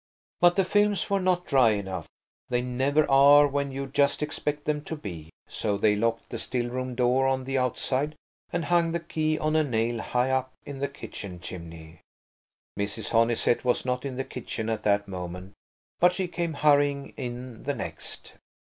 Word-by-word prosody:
But 175 0 +5
the 195 - +3
films 205 +1 +2
were 200 - +3
not 180 -1 +1
dry 130 -6 +4
enough. 95 -5 -4 0.4
They 125 -1 +1
never 135 +4 +1
are 140 +2 +7
when 140 -1 -1
you 135 +1 -4
just 140 +2 +1
expect 150 -1 -3
them 150 -1 0
to 160 - -4
be; 85 - -8 0.2
so 105 -2 -2
they 105 +1 +3
locked 115 +2 -1
the - - -4
still 120 -1 -2
room 130 0 -3
door 125 +2 +3
on 130 -1 0
the 135 +1 -1
outside 130 +4 -1 0.4
and 175 -1 -1
hung 170 -1 +2
the 170 - 0
key 155 -1 -1
on 155 0 0
a 155 - +4
nail 115 -3 0
high 125 +1 0
up 130 0 0
in 140 -2 -7
the 140 - 0
kitchen 105 -8 -8
chimney. 85 -2 -9 0.8
Mrs. 100 +2 -3
Honeysett 115 +1 +2
was 125 0 +1
not 125 0 -1
in 135 -2 -4
the 135 - -2
kitchen 115 -3 -5
at 110 - -1
that 100 0 +2
moment, 90 0 -7 0.5
but 180 +1 +5
she 185 0 -2
came 170 -1 -2
hurrying 145 -1 +2
in 125 -1 -6
the 145 +1 -2
next. - - -7
130 Hz, 185 wpm, -27 LUFS, 115-150 Hz, 0.8 s, are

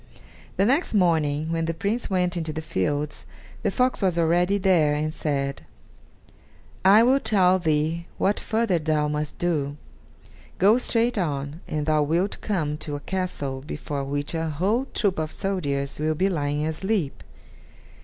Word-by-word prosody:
The 195 - +3
next 270 - +1
morning, 160 -4 +2
when 165 0 0
the 165 0 -2
Prince 210 +8 -2
went 180 -2 +1
into 160 -2 -2
the 155 - -4
fields, 145 +3 -2 0.4
the - - +1
fox 255 -2 +1
was 185 -3 +1
already 175 +4 +3
there, 175 -6 +3
and 155 +1 -2
said: 140 -3 -2 1.2
"I 200 +4 +7
will 260 +3 +4
tell 190 -6 +3
thee 160 +1 0
what 200 +2 +1
further 220 -6 0
thou 155 -1 +1
must 150 0 -3
do. 150 -5 -1 0.8
Go 210 +6 +5
straight 235 -2 +1
on, 145 -1 -3
and 150 -1 -2
thou 155 -1 +3
wilt 170 +7 0
come 155 -8 -1
to 150 -1 -4
a - - -4
castle 145 -7 -3
before 145 -1 -5
which 145 +2 -3
a 165 -1 -1
whole 195 - 0
troop 195 -5 0
of 155 0 -2
soldiers 145 -9 -2
will 155 +1 0
be 190 +5 +2
lying 145 -3 -1
asleep. 160 0 -2
165 Hz, 155 wpm, -25 LUFS, 150-190 Hz, 1.2 s, I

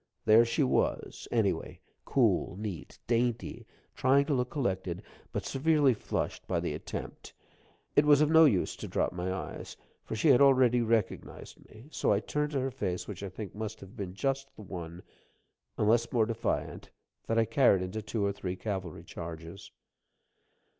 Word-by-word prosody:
There 110 +2 +7
she 115 +5 +1
was, 130 - -1
anyway - - 0 0.3
cool, - - +2
neat, 100 -5 -6
dainty, 120 0 -1 0.3
trying 135 +2 +3
to 145 - 0
look 125 -2 0
collected, 95 - -2 0.3
but - - -3
severely 145 -1 +3
flushed 110 - -3
by - - 0
the - - -2
attempt. - - -7 0.6
It 145 - +5
was 145 -1 +6
of 150 0 +3
no 160 0 +8
use 105 -11 +2
to - - -6
drop - - 0
my 90 +1 -3
eyes, 95 - -6 0.3
for - - -5
she 150 +8 +2
had 130 -2 +6
already 130 -3 +5
recognized 115 -3 -2
me; 110 +5 -14
so - - +1
I 100 - +3
turned 150 +6 -2
to 135 - +1
her 130 - 0
a - - -10
face 95 -9 -3
which 100 -4 -7
I 100 - -4
think 95 +1 -7
must 110 +1 -5
have 95 0 -13
been 95 -2 -6
just 135 +3 -1
the 105 - -11
one 85 -2 -7 0.7
unless 115 +2 +2
more 115 -3 +3
defiant 115 -1 -3 0.4
that 115 - 0
I 115 - +4
carried 115 - +4
into 95 +4 -4
two 105 0 -2
or 100 - +1
three 95 -2 -4
cavalry 95 -5 -5
charges. 85 +2 -8
110 Hz, 175 wpm, -30 LUFS, 95-135 Hz, 0.7 s, no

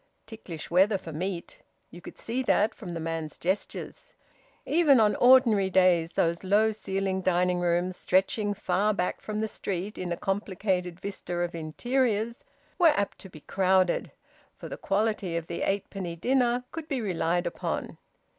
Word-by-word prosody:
Ticklish 190 -9 -9
weather 195 +4 +4
for 165 - -9
meat 180 +2 -5 0.3
you 175 - -11
could - - -11
see 240 +3 -2
that 220 -3 +2
from 180 -6 -8
the - - -3
man's 160 -1 -4
gestures. 205 - -4 0.5
Even 300 -5 +4
on 210 -1 +4
ordinary 240 -6 +5
days 180 -3 +3
those 170 +2 0
low 210 +3 +3
ceiled 195 -2 -2
dining 180 0 +2
rooms, 175 +1 0
stretching 205 +2 +1
far 200 +2 +1
back 180 -2 -2
from 215 0 -3
the 220 - 0
street 195 0 -4
in 180 -1 -3
a 170 - -1
complicated 190 -2 -2
vista 190 -3 -5
of 175 0 -2
interiors, 225 +7 -1 0.4
were 350 - +7
apt 200 - -2
to 190 - -10
be 155 -4 -13
crowded; 185 0 +1 0.5
for - - -8
the - - -6
quality 200 -4 -1
of 165 - -4
the 170 - -5
eightpenny 195 -3 -2
dinner 245 +2 +2
could 325 -1 -6
be 275 -4 -1
relied 175 -4 0
upon. - - -4
190 Hz, 160 wpm, -27 LUFS, 175-215 Hz, 0.5 s, were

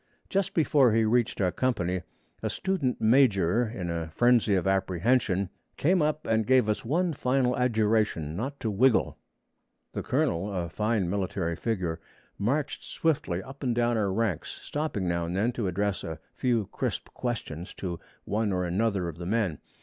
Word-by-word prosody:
Just 195 0 0
before 145 -7 +4
he 110 0 +3
reached 120 +1 +1
our 90 -3 +2
company, 95 -8 0 0.4
a - - -1
student 185 -10 -1
major, 110 -3 +4
in 90 -7 -4
a 85 -1 -3
frenzy 115 +3 +3
of 95 - 0
apprehension, 95 +1 +1 0.3
came 180 +4 +3
up 155 0 0
and 110 -1 +1
gave 130 -3 +4
us 105 - 0
one 170 +7 +1
final 125 -2 +1
adjuration 110 -9 +1
not 135 +9 -4
to 110 - -1
wiggle. 120 +4 +3 0.7
The - - -2
colonel 95 +5 0
a 90 -3 -2
fine 105 +1 0
military 95 -2 -1
figure 90 -5 -2 0.4
marched 135 +8 -1
swiftly 100 - -1
up 135 +4 -11
and 125 -4 0
down 120 0 +2
our 105 -3 +1
ranks, 100 -5 -1
stopping 145 - -2
now 85 -1 0
and 90 +2 -2
then 110 +5 +2
to 115 -4 -2
address 100 +1 -1
a 80 - -5 0.2
few 120 -5 +1
crisp - - -3
questions 100 -9 -4
to 90 -3 -4 0.2
one 105 0 0
or 90 -1 0
another 95 0 0
of 85 -1 -7
the 85 - -5
men. 100 -7 0
110 Hz, 165 wpm, -28 LUFS, 90-125 Hz, 0.7 s, before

